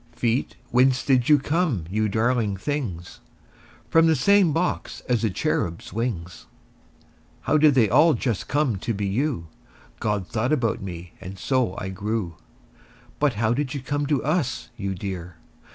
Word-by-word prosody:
Feet, 120 Hz, +2 st, -1 dB, 0.2 s
whence 130 Hz, +1 st, +3 dB
did 130 Hz, -2 st, +3 dB
you 150 Hz, -, +7 dB
come, 145 Hz, -, 0 dB
you 110 Hz, +4 st, 0 dB
darling 110 Hz, -1 st, +1 dB
things? 100 Hz, -, -4 dB, 0.7 s
From 165 Hz, 0 st, +5 dB
the 160 Hz, -, +4 dB
same 195 Hz, +4 st, +4 dB
box 170 Hz, +4 st, -2 dB
as 120 Hz, -3 st, 0 dB
the 110 Hz, -, +1 dB
cherubs' 85 Hz, -2 st, -2 dB
wings. 95 Hz, -8 st, -4 dB, 0.9 s
How 155 Hz, -, +2 dB
did 150 Hz, -2 st, +5 dB
they 120 Hz, -5 st, +5 dB
all 150 Hz, -, +5 dB
just 115 Hz, -7 st, -2 dB
come 140 Hz, -7 st, +1 dB
to 110 Hz, +4 st, -3 dB
be 100 Hz, 0 st, -2 dB
you? 115 Hz, -, -1 dB, 0.5 s
God 105 Hz, -3 st, -1 dB
thought 120 Hz, +5 st, -1 dB
about 120 Hz, -7 st, +1 dB
me, 90 Hz, -2 st, -7 dB
and 95 Hz, +1 st, -8 dB
so 120 Hz, -1 st, 0 dB
I 95 Hz, -, -4 dB
grew. 100 Hz, -2 st, -3 dB, 0.8 s
But 145 Hz, -3 st, +2 dB
how 110 Hz, +2 st, +1 dB
did 140 Hz, +1 st, -2 dB
you -, -, -2 dB
come 145 Hz, +2 st, -2 dB
to 145 Hz, -3 st, +1 dB
us, 140 Hz, -6 st, -1 dB
you 100 Hz, -2 st, -3 dB
dear? 90 Hz, -2 st, -6 dB
120 Hz, 160 wpm, -24 LUFS, 95-145 Hz, 0.9 s, you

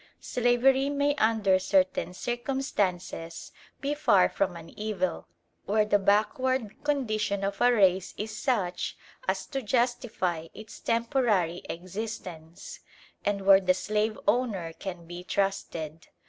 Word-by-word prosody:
Slavery 255 Hz, +3 st, +2 dB
may 285 Hz, 0 st, +1 dB
under 215 Hz, -6 st, +3 dB
certain 185 Hz, -1 st, +1 dB
circumstances 205 Hz, -10 st, -2 dB, 0.3 s
be 280 Hz, +1 st, 0 dB
far 200 Hz, -11 st, +4 dB
from 195 Hz, -3 st, -1 dB
an 165 Hz, -1 st, -10 dB
evil, 215 Hz, +6 st, -3 dB, 0.4 s
where 215 Hz, +1 st, +2 dB
the 205 Hz, -1 st, +3 dB
backward 215 Hz, +4 st, +1 dB
condition 215 Hz, -9 st, 0 dB
of 195 Hz, 0 st, -2 dB
a 245 Hz, -, +6 dB
race 190 Hz, -5 st, +3 dB
is 215 Hz, +1 st, -4 dB
such 215 Hz, -7 st, -1 dB, 0.3 s
as 190 Hz, 0 st, 0 dB
to 270 Hz, -, -4 dB
justify 230 Hz, -8 st, 0 dB
its 215 Hz, 0 st, -10 dB
temporary 230 Hz, -, +1 dB
existence, 180 Hz, -2 st, -7 dB, 0.4 s
and 200 Hz, -1 st, -1 dB
where 195 Hz, 0 st, +8 dB
the 185 Hz, -1 st, +3 dB
slave 215 Hz, +3 st, -1 dB
owner 205 Hz, -7 st, +1 dB
can 175 Hz, 0 st, -7 dB
be 175 Hz, +1 st, -8 dB
trusted. 170 Hz, -5 st, -2 dB
205 Hz, 120 wpm, -28 LUFS, 185-240 Hz, 0.4 s, where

